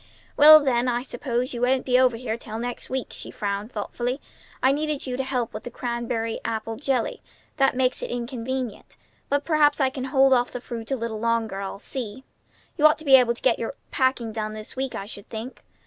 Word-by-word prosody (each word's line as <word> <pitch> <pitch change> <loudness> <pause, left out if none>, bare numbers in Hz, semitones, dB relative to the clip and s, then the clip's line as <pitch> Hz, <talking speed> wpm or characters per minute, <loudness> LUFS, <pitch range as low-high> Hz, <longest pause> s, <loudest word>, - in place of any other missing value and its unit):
"Well, 310 +1 +10
then, 255 -4 +1
I 245 0 0
suppose 250 -1 -2
you 240 - -4
won't 255 +1 +2
be 250 -1 +4
over 250 -3 +4
here 225 -2 -3
till 220 -2 -7
next 245 +1 -5
week," 260 -2 -3
she - - -8
frowned 205 +2 -3
thoughtfully. 240 +5 -3 0.4
"I 260 - +6
needed 300 0 -1
you 255 -2 -3
to 265 - -1
help 250 -3 -2
with 215 - -5
the - - -7
crabapple 230 -2 -3
jelly. 265 -2 -1 0.4
That 270 -2 +3
makes 255 0 +1
it - - -4
inconvenient. 245 0 -4 0.3
But 285 0 +1
perhaps 305 -2 +3
I 265 -2 +2
can 260 -1 -4
hold 270 0 +4
off 245 -1 +3
the 250 - -5
fruit 230 -2 -7
a 270 - +1
little 230 -3 -4
longer; 225 -3 0
I'll 195 0 -5
see. 240 +2 -6 0.6
You 305 - +8
ought 305 +1 +2
to 315 - -11
be 270 -2 +8
able 245 -2 +5
to - - -9
get 245 -3 +4
all - - -8
your 230 - -3 0.2
packing 260 -4 +1
done 215 -1 -3
this 215 0 -9
week, 265 0 -3
I 195 - -4
should 205 -1 -10
think. 230 +4 -7
245 Hz, 215 wpm, -25 LUFS, 230-265 Hz, 0.6 s, Well